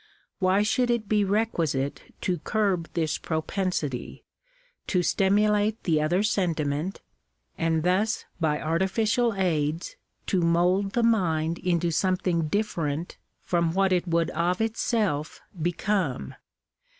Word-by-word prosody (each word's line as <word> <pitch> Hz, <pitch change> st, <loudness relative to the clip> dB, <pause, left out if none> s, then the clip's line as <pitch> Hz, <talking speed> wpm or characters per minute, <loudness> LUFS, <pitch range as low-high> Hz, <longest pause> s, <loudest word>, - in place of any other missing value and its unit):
Why 190 Hz, +1 st, +3 dB
should 245 Hz, +3 st, +1 dB
it 235 Hz, -3 st, 0 dB
be 210 Hz, 0 st, +2 dB
requisite 165 Hz, -9 st, -1 dB
to 180 Hz, -2 st, -1 dB
curb 195 Hz, -6 st, 0 dB
this 160 Hz, -3 st, 0 dB
propensity, 160 Hz, -4 st, -3 dB, 0.6 s
to 180 Hz, -2 st, +1 dB
stimulate 210 Hz, +4 st, +2 dB
the 155 Hz, -3 st, +2 dB
other 175 Hz, +6 st, +1 dB
sentiment, 165 Hz, -4 st, -1 dB, 0.5 s
and 160 Hz, -1 st, 0 dB
thus 195 Hz, +6 st, +1 dB
by 155 Hz, -3 st, +1 dB
artificial 210 Hz, +7 st, +1 dB
aids 165 Hz, -4 st, -1 dB, 0.3 s
to 185 Hz, -, +1 dB
mould 180 Hz, +4 st, +2 dB
the 240 Hz, -, +1 dB
mind 170 Hz, -8 st, +1 dB
into 175 Hz, -1 st, 0 dB
something 180 Hz, -1 st, +1 dB
different 165 Hz, -5 st, -2 dB, 0.3 s
from 170 Hz, -2 st, +1 dB
what 195 Hz, -1 st, +3 dB
it 180 Hz, 0 st, 0 dB
would 170 Hz, 0 st, +1 dB
of 175 Hz, +3 st, 0 dB
itself 220 Hz, -8 st, -1 dB, 0.2 s
become 175 Hz, -3 st, -1 dB
180 Hz, 115 wpm, -26 LUFS, 160-205 Hz, 0.6 s, Why